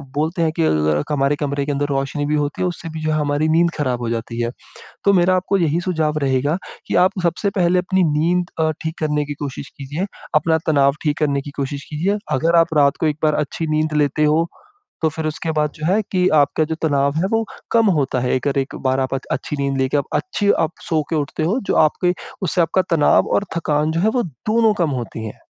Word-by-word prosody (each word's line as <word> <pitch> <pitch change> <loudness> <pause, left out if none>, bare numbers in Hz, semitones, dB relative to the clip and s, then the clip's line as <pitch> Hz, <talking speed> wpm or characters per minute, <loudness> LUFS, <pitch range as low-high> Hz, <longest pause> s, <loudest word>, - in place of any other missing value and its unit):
बोलते 160 +4 0
हैं 160 -1 +2
कि - - +4
अ, 80 - +3
ल 75 -1 +1
क - - -7
हमारे 140 0 +2
कमरे 140 -1 -2
के 145 - -1
अंदर 145 0 0
रोशनी 140 +1 -1
भी 150 +1 0
होती 145 0 -1
है, 185 - +2
उससे 175 -1 -5
भी 160 0 -6
जो 155 - 0
है, 155 - +1
हमारी 145 +1 0
नींद 170 0 +3
खराब 130 -5 -1
हो 120 - -2
जाती 115 0 -3
है। 120 0 -1 0.5
तो 200 - +5
मेरा 185 +1 +3
आपको 195 +1 0
यही 165 -2 +1
सुझाव 160 -4 0
रहेगा 135 +4 +1 0.3
कि - - -1
आप 185 - +3
सबसे 175 +4 +1
पहले 180 0 +3
अपनी 185 +1 +1
नींद 170 +3 +1
अ, 160 0 +2
ठीक 160 0 -4
करने 150 -1 0
की 145 - -4
कोशिश 140 0 -6
कीजिए, 145 +6 -3 0.3
अपना 160 +2 +3
तनाव 140 -3 +4
ठीक 150 -2 0
करने 140 -3 +1
की 145 - -9
कोशिश 140 +1 -4
कीजिए। 175 +7 0 0.2
अगर 165 +5 +2
आप 165 - -7
रात 140 -1 +4
को - - +2
एक 150 -1 -1
बार 155 -1 +3
अच्छी 160 +2 -4
नींद 155 0 0
लेते 145 +1 0
हो, 155 +2 +3 0.6
तो 160 - +4
फिर 160 +1 -4
उसके 155 +1 -3
बाद 150 0 +1
जो 155 - -5
है 195 +5 +3
कि 180 -1 +3
आपका 150 +1 +3
जो - - +1
तनाव 140 -2 +1
है, 170 +4 +1
वो 225 0 +2 0.3
कम 230 -1 +4
होता 135 -2 0
है। 125 0 0
एक 130 - -2
अर 140 0 0
एक 135 0 -2
बार 130 +1 +2
आप 130 0 -1
आद 135 - -4
अच्छी 150 - -3
नींद 140 -1 -1
लेके 130 +2 +1
आप 140 - +1
अच्छी 205 - 0
आप 160 - 0 0.2
सो 160 -2 +1
के 165 - 0
उठते 150 +1 -2
हो, 185 +10 +1
जो - - +1
आपके 180 +3 0 0.3
उससे 180 0 +1
आपका 170 +3 +2
तनाव 150 - +4
और 200 - +1
थकान 150 -2 +1
जो 165 - 0
है, 205 - +3
वो 245 +2 +1
दोनों 215 - +1
कम 160 - +1
होती 110 -1 -6
हैं। 110 - -8
150 Hz, 245 wpm, -20 LUFS, 140-170 Hz, 0.6 s, तो